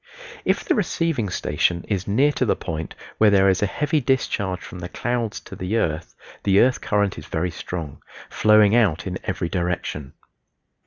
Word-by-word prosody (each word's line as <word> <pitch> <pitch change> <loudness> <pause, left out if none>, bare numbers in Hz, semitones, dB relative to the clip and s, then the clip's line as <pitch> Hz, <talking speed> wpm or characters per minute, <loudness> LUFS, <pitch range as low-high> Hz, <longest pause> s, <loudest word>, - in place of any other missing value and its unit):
If - - +1
the - - +2
receiving 165 - 0
station 85 -1 0
is 100 -3 -2
near 135 +9 +3
to 140 - -1
the 115 - +2
point 80 0 -5 0.2
where 110 - +6
there 95 -1 +5
is 95 - +1
a 105 - +2
heavy 150 - 0
discharge 100 -7 0
from 90 - -9
the 85 0 -6
clouds 120 -1 -2
to - - -10
the 95 +5 -2
earth 80 -6 -2 0.3
the 100 0 +3
earth 125 +1 +3
current 105 -4 0
is 75 - -11
very 85 +2 -1
strong 85 -4 -6 0.3
flowing 105 0 +4
out 105 -8 +2
in 95 -1 -4
every 90 -2 -2
direction. 85 -6 -3
100 Hz, 175 wpm, -23 LUFS, 90-115 Hz, 0.3 s, where